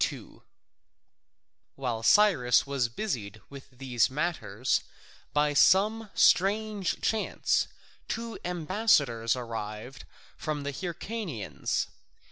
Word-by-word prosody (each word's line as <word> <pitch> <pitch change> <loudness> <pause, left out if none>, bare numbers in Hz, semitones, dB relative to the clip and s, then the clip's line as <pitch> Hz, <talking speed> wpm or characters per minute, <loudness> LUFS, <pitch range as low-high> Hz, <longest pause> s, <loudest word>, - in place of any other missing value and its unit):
[C.2] - - -5 1.3
While 125 -4 -3
Cyrus 140 - +5
was 135 -4 0
busied 115 - -4
with 140 -1 -11
these 125 -3 0
matters, 130 - -1 0.5
by 150 0 +2
some 210 +8 +4
strange 205 0 +2
chance 220 -1 +1 0.4
two 230 -2 -4
ambassadors 155 - +1
arrived 115 +1 -6 0.3
from 150 -2 -3
the 145 - -3
Hyrcanians. 170 - -3
140 Hz, 90 wpm, -28 LUFS, 120-195 Hz, 1.3 s, Cyrus